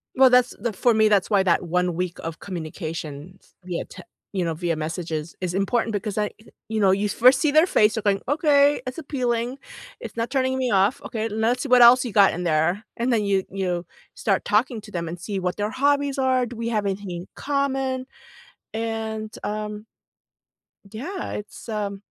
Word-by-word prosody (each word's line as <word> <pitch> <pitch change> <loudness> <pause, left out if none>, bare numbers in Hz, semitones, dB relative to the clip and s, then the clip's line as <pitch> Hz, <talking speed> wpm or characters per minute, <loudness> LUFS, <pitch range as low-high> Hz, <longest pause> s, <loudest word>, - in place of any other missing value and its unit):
Well, 260 0 +7
that's 250 0 +4
t 235 - 0
for 230 +4 +2
me, 220 0 +4
that's 205 -3 +2
why 200 -3 +3
that 180 -1 +2
1 180 +1 +1
week 180 0 -3
of 165 0 -6
communications 165 -1 -7
via, 175 -2 -4
te 185 - -12 0.3
you 185 -3 -1
know, 165 - -1
via 170 +1 -1
messages 160 0 -4
is 180 -1 -2
important 225 +4 0
because, 205 0 -3
I 210 - +2
eh 215 - -16 0.2
you 220 0 -2
know, 195 -2 +5
you 200 +2 +1
first 255 +5 +5
see 310 - +2
their 310 +3 +6
face. 215 - +3
You're 225 - -3
going, 200 -1 +1
"Okay, 290 0 +4
it's 255 0 -5
appealing, 250 -4 -2 0.4
it's - - -8
not 230 0 -2
turning 260 -1 0
me 260 -1 0
off, 200 +8 +2
okay, 225 -5 -3
let's 225 +4 0
see 280 - -5
what 250 0 +6
else 245 +2 +8
you 240 - -4
got 200 -1 +5
in 180 - -4
there." 170 +5 +1
And 240 +2 0
then 225 -3 +2
you 195 -1 +2
you 180 -2 -2 0.3
start 195 -3 0
talking 220 +2 +1
to 210 - -13
them 170 -3 -3
and 170 +2 -6
see 195 +2 -4
what 180 -1 -2
their 210 +1 -1
hobbies 280 +1 +1
are, 260 -1 +2
do 240 0 -8
we 230 0 -3
have 215 -3 0
anything 195 -1 -3
in 175 +1 -6
common? 270 -2 -1 0.7
And, 220 -1 -3
um 210 0 -4 1.1
Yeah, 340 - -5
it's, 210 +3 -8
um, 200 -2 -3
215 Hz, 200 wpm, -24 LUFS, 185-250 Hz, 1.1 s, else